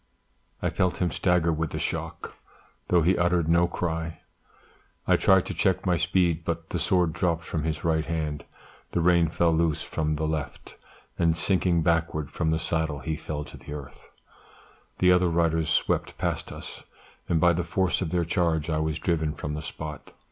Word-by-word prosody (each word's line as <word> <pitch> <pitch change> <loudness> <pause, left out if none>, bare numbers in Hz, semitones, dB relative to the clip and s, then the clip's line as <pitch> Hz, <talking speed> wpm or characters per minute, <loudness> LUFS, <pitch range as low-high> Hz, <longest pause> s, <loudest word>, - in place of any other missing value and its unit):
I - - +1
felt 90 -1 0
him 90 -2 0
stagger 90 -2 +2
with 80 0 -2
the - - -5
shock, - - -4 0.5
though 85 -2 +3
he 90 +2 +3
uttered 85 -2 +2
no 85 +1 +4
cry; 80 -1 -3 0.9
I - - +5
tried 95 -1 +4
to - - -4
check 95 -1 +1
my 90 -2 +3
speed, 85 -1 +1
but 85 -1 -4
the 90 - -1
sword 85 0 +2
dropped 85 -2 0
from 80 - -3
his 80 -1 -2
right 80 -1 +1
hand, 75 -3 -3 0.5
the - - +1
rein 85 0 +4
fell 85 +1 +2
loose 80 -2 +1
from 75 0 -1
the 80 +1 -2
left, 75 -2 -4 0.4
and 85 -1 +3
sinking 90 -1 +2
backward 80 -3 0
from 80 -2 -1
the 80 - +2
saddle 80 -3 -1
he 80 +2 -2
fell 75 -1 -5
to - - -11
the - - -9
earth; 70 -3 -10 0.9
the 90 0 +5
other 90 -1 +4
riders 80 -1 +1
swept 80 - 0
past - - -2
us, - - -9 0.5
and 85 - +2
by 85 +1 +5
the 85 +1 -1
force 95 +3 0
of 90 - -1
their 85 0 0
charge 85 -2 0
I 75 - +1
was 80 0 -1
driven 80 -3 -1
from 75 - -4
the 75 - -4
spot. 75 -1 -7
85 Hz, 185 wpm, -26 LUFS, 80-85 Hz, 0.9 s, I